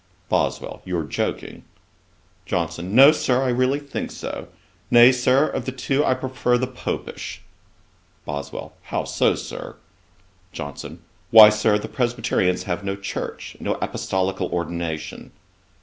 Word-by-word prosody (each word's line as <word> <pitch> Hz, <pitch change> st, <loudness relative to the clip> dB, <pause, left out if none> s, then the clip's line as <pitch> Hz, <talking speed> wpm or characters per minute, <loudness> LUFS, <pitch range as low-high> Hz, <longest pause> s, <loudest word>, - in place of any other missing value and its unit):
BOSWELL. -, -, -1 dB
'You 90 Hz, -1 st, -3 dB
are 80 Hz, -, -1 dB
joking.' 75 Hz, -, -4 dB, 0.8 s
JOHNSON. 85 Hz, +2 st, -2 dB
'No, 135 Hz, +4 st, +9 dB
Sir, 130 Hz, -4 st, +1 dB
I 130 Hz, -, 0 dB
really 130 Hz, +3 st, +2 dB
think 145 Hz, -1 st, -5 dB
so. -, -, -6 dB, 0.4 s
Nay, 120 Hz, +1 st, +8 dB
Sir, 130 Hz, +3 st, +3 dB
of -, -, -4 dB
the 130 Hz, -, -2 dB
two, 135 Hz, +2 st, 0 dB
I 130 Hz, -, +2 dB
prefer 130 Hz, -1 st, 0 dB
the 130 Hz, -, 0 dB
Popish.' 125 Hz, 0 st, -6 dB, 0.8 s
BOSWELL. 70 Hz, -1 st, -6 dB
'How -, -, -2 dB
so, -, -, +1 dB
Sir?' -, -, -7 dB, 0.8 s
JOHNSON. 70 Hz, +3 st, -7 dB, 0.3 s
'Why, 110 Hz, -1 st, +10 dB
Sir, 105 Hz, 0 st, +2 dB
the 105 Hz, -, -6 dB
Presbyterians 120 Hz, -7 st, 0 dB
have 90 Hz, +1 st, -3 dB
no 100 Hz, 0 st, -2 dB
church, 100 Hz, 0 st, -6 dB
no -, -, -1 dB
apostolical 95 Hz, 0 st, -2 dB
ordination.' 85 Hz, -3 st, -4 dB
105 Hz, 135 wpm, -23 LUFS, 85-130 Hz, 0.8 s, Why